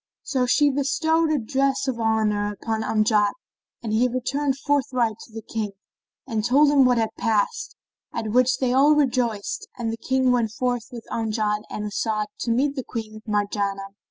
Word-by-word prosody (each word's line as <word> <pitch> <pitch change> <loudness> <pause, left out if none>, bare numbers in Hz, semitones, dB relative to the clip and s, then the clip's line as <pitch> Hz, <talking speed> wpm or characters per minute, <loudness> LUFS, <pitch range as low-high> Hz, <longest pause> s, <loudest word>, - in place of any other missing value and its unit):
So 255 -3 0
she 290 +3 +4
bestowed 320 +4 +1
a 305 - +2
dress 270 +3 0
of 250 -3 -2
honour 215 -2 +1
upon 220 +1 -3
Amjad 215 -1 +2 0.5
and 220 -2 -3
he 235 +3 +3
returned 270 +3 -1
forthright 255 -6 0
to - - -13
the 225 0 -8
King 215 -3 -4 0.5
and 225 -5 -2
told 280 +6 +4
him 275 -2 +5
what 250 -1 +3
had 225 -1 0
passed, 225 - 0 0.4
at 220 -1 -3
which 255 +2 +3
they 255 -2 0
all 285 +3 +5
rejoiced 245 -7 0
and 230 -2 -2
the - - -5
King 260 +2 +1
went 235 -3 +1
forth 245 -1 -1
with 235 -2 -9
Amjad 215 -2 -1
and 210 - -4
As'ad 215 +1 -1
to - - -3
meet 275 +5 +1
Queen 215 -2 -6
Marjanah. 200 -1 -1
235 Hz, 170 wpm, -24 LUFS, 215-265 Hz, 0.5 s, him